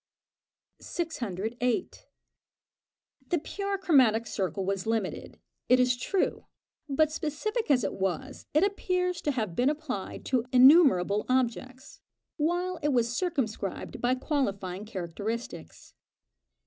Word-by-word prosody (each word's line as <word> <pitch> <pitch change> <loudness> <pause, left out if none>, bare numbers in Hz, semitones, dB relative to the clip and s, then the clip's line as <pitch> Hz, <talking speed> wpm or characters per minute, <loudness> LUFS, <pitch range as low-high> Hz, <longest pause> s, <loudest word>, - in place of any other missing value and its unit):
608. 245 - -3 1.2
The 350 - +1
pure 395 +5 -3
chromatic 255 - +4
circle 195 -3 -2
was 195 +1 -2
limited, 225 -4 -3 0.3
it 250 +1 +6
is 250 0 +3
true; 365 +10 -1 0.4
but, 310 +2 +2
specific 315 - -3
as 255 -5 +4
it 195 - -1
was, 195 +9 -3
it 305 - +5
appears 365 -3 0
to - - -1
have 215 -10 -3
been 250 +7 +3
applied 290 -10 -5
to 250 -3 +1
innumerable 255 - +6
objects, 255 +1 -2 0.4
while 350 +4 0
it 295 -2 -1
was 240 -2 +1
circumscribed 235 - -3
by 245 +1 +2
qualifying 205 - -2
characteristics. 210 +4 -6
255 Hz, 110 wpm, -28 LUFS, 215-310 Hz, 1.2 s, it